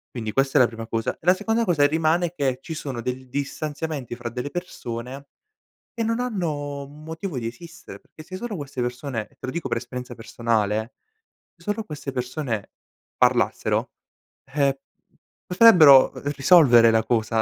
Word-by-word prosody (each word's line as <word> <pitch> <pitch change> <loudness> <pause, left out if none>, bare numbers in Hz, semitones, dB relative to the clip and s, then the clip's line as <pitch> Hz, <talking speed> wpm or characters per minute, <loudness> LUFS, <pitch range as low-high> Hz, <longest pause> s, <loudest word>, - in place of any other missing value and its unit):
quindi 110 -3 -4
questa 135 +2 +2
è - - +4
la 125 - +7
prima 115 -1 -8
cosa. 115 -1 -1
E - - -31
la 180 - +7
seconda 225 +4 0
cosa 160 -8 +2
e - - +7
rimane, 160 +3 +1
che 135 -5 -1
ci 160 - -7
sono 135 -5 -5
del 125 +2 -5
distanziamenti 145 -1 -4
fra 120 -1 -5
delle 125 +4 -5
persone 135 -6 -6 0.7
che 230 -2 -2
non 230 +2 -1
hanno 150 - -3
motivo 160 +1 -6
di 115 - -4
esistere, 170 +8 -10
perché 155 - -15
se 185 +3 -9
solo 220 -2 -5
queste 140 -3 -5
persone, 125 -2 -4
te - - -30
lo 130 - -4
dico 170 +2 -4
per - - 0
esperienza 125 +1 -7
personale, 115 0 -1 0.6
solo 210 +1 -4
queste 150 -5 -6
persone 125 -4 -4 0.5
parlassero, - - +1 0.5
ehm, 140 0 +1 0.7
potrebbero 175 -9 +7
r - - -10
risolvere 135 -7 +6
la 115 0 +3
cosa. 115 -1 -1
140 Hz, 160 wpm, -23 LUFS, 120-165 Hz, 0.7 s, la